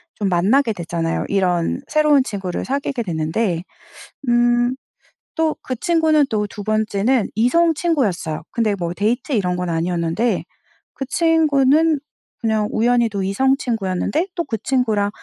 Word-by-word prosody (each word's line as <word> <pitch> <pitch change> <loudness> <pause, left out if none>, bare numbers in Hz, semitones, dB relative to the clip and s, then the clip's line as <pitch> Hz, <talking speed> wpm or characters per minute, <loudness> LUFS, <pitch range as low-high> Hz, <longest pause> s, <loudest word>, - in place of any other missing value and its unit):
좀 205 -2 -1
만나게 215 +8 +2
되잖아요? 170 -2 -2
이런 180 +2 0
새로운 300 -3 +4
친구를 195 -7 -4
사귀게 275 -2 -2
됐는데 170 +1 -1 0.7
음 240 +1 +3 0.6
또 320 -1 +1
그 255 - -4
친구는 315 0 +2
또 210 -1 -1
2 205 +1 -8
번째는 215 +2 +1
이성 325 +9 +3
친구였어요. 250 - -1
근데 220 -3 0
뭐 175 -3 -3
데이트 225 +9 -1
이런 185 -7 +1
건 180 0 -3
아니었는데 170 +6 0 0.5
그 270 - -5
친구는 310 0 +3 0.4
그냥 220 -2 +1
우연히도 230 -3 +1
이성 260 +8 +2
친구였는데 230 - -1
또 340 - -1
그 225 -8 -4
친구랑 220 -6 +1
225 Hz, 295 characters per minute, -20 LUFS, 190-275 Hz, 0.7 s, 새로운